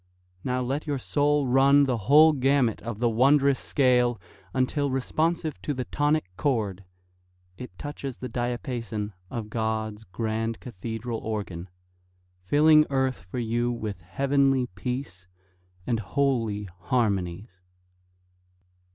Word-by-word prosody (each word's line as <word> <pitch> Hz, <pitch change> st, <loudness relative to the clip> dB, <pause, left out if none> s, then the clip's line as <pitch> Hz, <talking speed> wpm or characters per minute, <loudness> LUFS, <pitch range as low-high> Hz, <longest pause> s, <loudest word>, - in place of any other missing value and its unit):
Now 125 Hz, 0 st, -1 dB
let 135 Hz, +5 st, -2 dB
your 145 Hz, -2 st, 0 dB
soul 145 Hz, +2 st, +1 dB
run 135 Hz, +3 st, +5 dB
the 130 Hz, -3 st, +1 dB
whole 155 Hz, +2 st, +8 dB
gamut 135 Hz, -4 st, +2 dB
of 115 Hz, -2 st, -5 dB
the 120 Hz, +2 st, +1 dB
wondrous 135 Hz, +4 st, +4 dB
scale 125 Hz, -4 st, +2 dB, 0.3 s
Until, 140 Hz, +2 st, 0 dB
responsive 155 Hz, +4 st, -1 dB
to 145 Hz, -, -2 dB
the 125 Hz, -1 st, -3 dB
tonic 150 Hz, +1 st, +1 dB
chord, 100 Hz, -7 st, -1 dB, 0.7 s
It 95 Hz, -4 st, -10 dB
touches 140 Hz, -3 st, -6 dB
the 130 Hz, -, -5 dB
diapason 120 Hz, -4 st, -3 dB, 0.2 s
of 110 Hz, -3 st, -5 dB
God's 110 Hz, -1 st, -2 dB
grand 110 Hz, +3 st, -3 dB
cathedral 115 Hz, +1 st, -5 dB
organ, 95 Hz, -5 st, -5 dB, 0.7 s
Filling 150 Hz, +9 st, +5 dB
earth 130 Hz, -7 st, -1 dB
for 125 Hz, -, -5 dB
you 120 Hz, +1 st, 0 dB
with 110 Hz, -5 st, -5 dB
heavenly 135 Hz, +6 st, +1 dB
peace 95 Hz, -3 st, -5 dB, 0.6 s
And 120 Hz, -2 st, 0 dB
holy 115 Hz, -3 st, 0 dB
harmonies. 95 Hz, -2 st, -1 dB
125 Hz, 115 wpm, -26 LUFS, 110-140 Hz, 0.7 s, whole